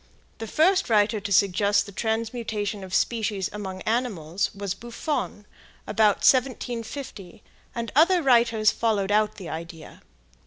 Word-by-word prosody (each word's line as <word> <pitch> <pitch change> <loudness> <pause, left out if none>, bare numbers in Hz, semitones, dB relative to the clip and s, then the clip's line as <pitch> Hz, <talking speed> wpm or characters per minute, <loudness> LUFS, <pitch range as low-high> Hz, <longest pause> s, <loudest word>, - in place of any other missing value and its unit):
The 225 - -5
first 365 - +2
writer 215 0 +3
to 205 0 -6
suggest 200 +1 +3
the 200 - -10
transmutation 220 -2 -3
of 190 - -9
species 210 -2 -1
among 190 -3 -6
animals 200 -7 -1
was 200 -2 -3
Buffon, 235 0 -4 0.4
about 210 -1 +2
1750, 245 -6 -1 0.3
and 230 -2 -4
other 340 +3 +4
writers 235 -4 +4
followed 210 -4 0
out 215 0 +2
the 190 -4 -9
idea. 165 -1 -9
215 Hz, 125 wpm, -25 LUFS, 200-235 Hz, 0.4 s, other